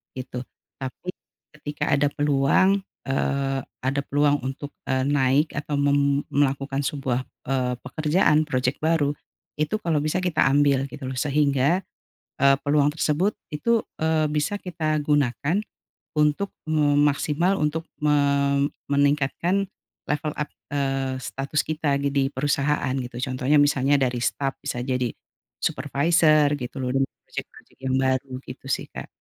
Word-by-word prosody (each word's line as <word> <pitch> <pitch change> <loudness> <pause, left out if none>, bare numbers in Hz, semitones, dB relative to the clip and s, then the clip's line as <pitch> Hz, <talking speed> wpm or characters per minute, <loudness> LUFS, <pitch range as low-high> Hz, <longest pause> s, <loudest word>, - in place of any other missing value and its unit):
gitu. 125 -1 -5 0.4
Tapi 135 +7 -5 0.5
ketika 145 0 -3
ada 145 +1 +3
peluang, 145 +7 +3 0.2
eee, 135 0 0 0.2
ada 135 +2 0
peluang 145 0 +3
untuk, 140 +2 -6 0.2
eee, 130 0 +1
naik 140 +2 +3
atau 150 0 -3
mem 140 0 +2
melakukan 140 -1 +1
sebuah, 135 -4 -1 0.2
eee, 125 -2 0
pekerjaan 155 +2 +2
projek 130 -2 0
baru, 155 -2 +2 0.5
itu 155 +7 +1
kalo 170 -8 0
bisa 155 +5 -1
kita 170 -4 -1
ambil 140 -1 +3
gitu 145 0 -10
loh 130 -1 -3
sehingga, 145 +4 +2 0.6
eee, 140 0 +6
peluang 145 0 +3
tersebut 165 +7 +1 0.2
itu, 230 +9 +1 0.2
eee, 160 -1 +2
bisa 155 +7 0
kita 165 -5 -2
gunakan 145 +4 +1 0.5
untuk 150 +6 +1 0.2
me 155 -2 +2
maksimal 150 +5 +2
untuk 160 -1 -1 0.2
me 150 - +4 0.8
meningkatkan 145 +7 +2 0.4
level 150 0 -2
up, 150 - -3 0.2
eee, 135 -2 -1
status 135 +4 -2
kita 155 -2 0
di 140 0 0
di 140 -1 +2
perusahaan 140 0 0
gitu. 125 -1 -6 0.2
Contohnya 130 +3 +1
misalnya 145 -1 +4
dari 125 -3 +1
staf 135 +3 -1
bisa 120 - -3
jadi 125 -1 0 0.6
supervisor 155 +1 +3
gitu 125 +2 -6
loh 125 - -1
dengan 135 +1 +1 0.2
projek-projek - - -9
yang 130 0 -1
baru, 130 0 +1
gitu 130 +2 -10
sih 135 - -2
Kak. - - -7
145 Hz, 135 wpm, -24 LUFS, 135-150 Hz, 0.8 s, eee